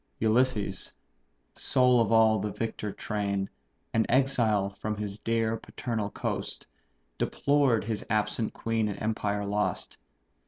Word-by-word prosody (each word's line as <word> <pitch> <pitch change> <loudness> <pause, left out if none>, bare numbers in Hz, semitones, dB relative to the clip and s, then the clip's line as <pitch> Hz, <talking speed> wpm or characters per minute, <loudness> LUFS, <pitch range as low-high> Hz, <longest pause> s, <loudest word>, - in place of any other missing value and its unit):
Ulysses, 110 -4 +1 0.6
sole 125 -2 +3
of 115 - +1
all 110 -1 +5
the 105 +1 -2
victor 110 -2 -3
train, 100 -1 -2 0.4
An 115 0 +2
exile 115 -7 +2
from 105 +2 -4
his 105 -1 -5
dear 115 0 0
paternal 110 -3 -3
coast, - - -4 0.5
Deplored 140 -6 +2
his 110 0 -3
absent 110 +1 0
queen 115 -1 -1
and 100 - -4
empire 105 -2 -1
lost. 105 +1 -2
110 Hz, 120 wpm, -28 LUFS, 105-115 Hz, 0.6 s, all